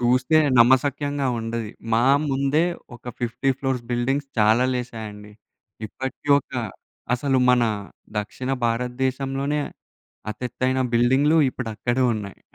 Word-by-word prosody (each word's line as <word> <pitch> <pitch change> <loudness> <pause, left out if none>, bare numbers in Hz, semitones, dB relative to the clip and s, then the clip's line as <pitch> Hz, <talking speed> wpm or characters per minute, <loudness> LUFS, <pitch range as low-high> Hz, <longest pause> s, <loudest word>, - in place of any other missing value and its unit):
చూస్తే 125 +5 +3 0.2
నమ్మశక్యంగా 140 +3 +3
ఉండది. 115 -1 -4 0.2
మా 115 +2 +3 0.3
ముందే 140 +4 +2 0.3
ఒక - - -28 0.2
50 125 +3 0
ఫ్లోర్స్ 135 -3 -1
బిల్డింగ్స్ 135 +4 0
చాలా 110 +3 +4
లేసాయండి. 110 -4 -6 0.5
ఇప్పటి 130 +6 -7
ఒక్క 145 - -12 0.6
అసలు 135 0 +1
మన 125 -1 +4 0.6
దక్షిణ 125 +5 -4 0.2
భారతదేశంలోనే 130 +4 -1 0.7
అతి 110 +4 -8
ఎత్తైన 130 +2 0
బిల్డింగ్‌లు 135 +7 +4
ఇప్పుడక్కడే 120 +1 -2
ఉన్నాయి. 100 -2 -7
125 Hz, 105 wpm, -23 LUFS, 115-135 Hz, 0.7 s, చాలా